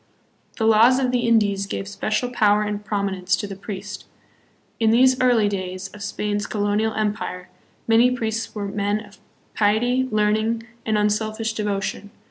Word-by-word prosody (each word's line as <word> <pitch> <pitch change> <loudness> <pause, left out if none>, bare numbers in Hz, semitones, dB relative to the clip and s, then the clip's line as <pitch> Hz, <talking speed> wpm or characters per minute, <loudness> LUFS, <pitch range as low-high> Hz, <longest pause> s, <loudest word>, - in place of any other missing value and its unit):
"The 225 - 0
Laws 225 +3 +6
of 255 -2 +1
the 245 -1 0
Indies" 205 -4 +2
gave 100 - -4
special 215 - -2
power 210 -3 +3
and 210 0 -4
prom 200 -1 -1
inence 185 -1 -1
to - - -4
the 200 -1 -7
priest. 200 +1 -7 0.7
In 225 -1 +3
these 255 +3 +4
early 240 -4 +4
days 185 -1 -4
of 210 - -13
Spain's 205 +1 -2
colonial 210 +1 0
empire 205 -4 -3 0.4
many 230 +2 +5
priests 225 -3 -3
were 205 -1 -3
men 205 +1 -1
of 200 -1 -18 0.3
piety, 245 +5 +2
learning, 215 +2 +1 0.2
and 215 -1 +2
un 210 0 +2
selfish 220 +1 -2
devotion. 205 -1 -3
210 Hz, 160 wpm, -22 LUFS, 205-225 Hz, 0.7 s, Laws